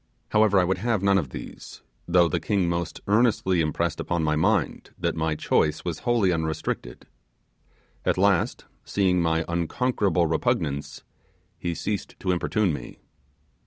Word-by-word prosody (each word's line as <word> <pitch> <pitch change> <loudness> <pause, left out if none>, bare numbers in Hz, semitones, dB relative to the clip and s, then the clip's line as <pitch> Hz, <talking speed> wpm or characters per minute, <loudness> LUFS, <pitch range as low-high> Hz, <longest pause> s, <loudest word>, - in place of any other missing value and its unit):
However, 105 -2 +4
I - - +4
would 95 +1 0
have 110 -2 0
none 100 0 +4
of 75 -8 -4
these, - - -10 0.2
though 85 0 +4
the 80 - -1
king 100 -4 0
most 85 -1 -3
earnestly 100 -5 +2
impressed 75 -2 -1
upon 85 -2 -1
my 75 0 +1
mind 100 +6 0
that - - -1
my 80 -1 0
choice 75 0 +1
was 85 -3 -3
wholly 120 -6 +2
unrestricted. 80 -7 -3 1.0
At - - +1
last, 95 -2 +2 0.2
seeing 95 -3 +1
my 80 -1 +1
unconquerable 85 +1 0
repugnance, 70 -3 -1 0.6
he 85 -1 -3
ceased 105 +3 -4
to 95 - 0
importune 90 +1 +1
me. - - -7
90 Hz, 145 wpm, -25 LUFS, 80-100 Hz, 1.0 s, However